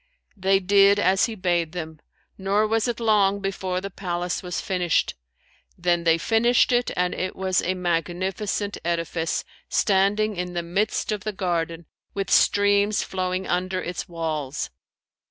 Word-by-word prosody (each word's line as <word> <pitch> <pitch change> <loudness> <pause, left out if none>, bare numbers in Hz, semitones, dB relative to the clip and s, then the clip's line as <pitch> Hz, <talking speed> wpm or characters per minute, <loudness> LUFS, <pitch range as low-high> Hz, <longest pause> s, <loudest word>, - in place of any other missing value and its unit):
They 195 0 +2
did 200 +1 +5
as 190 -1 +3
he 225 - -5
bade 175 -4 0
them, 160 -3 -6 0.4
nor 200 +2 +1
was 225 +2 +1
it 240 -1 -2
long 205 -3 +3
before 190 -2 -2
the 200 +1 -6
palace 175 -2 -3
was 180 -1 -4
finished: 180 -3 0 0.6
then 175 -1 +1
they 165 0 +5
furnished 230 +8 +3
it 245 0 +2
and 180 0 +1
it 185 - -3
was 190 -1 +1
a 185 +2 -1
magnificent 185 +4 -2
edifice, 165 -1 -1 0.3
standing 205 +2 +2
in 180 0 -4
the 175 -1 -2
midst 200 +6 -1
of 210 -2 -3
the 215 - -2
garden, 170 -3 -2 0.3
with 195 -1 -3
streams 205 +1 +3
flowing 185 0 -2
under 185 +1 -1
its 175 0 -5
walls. 155 -5 -3
185 Hz, 150 wpm, -24 LUFS, 175-200 Hz, 0.6 s, did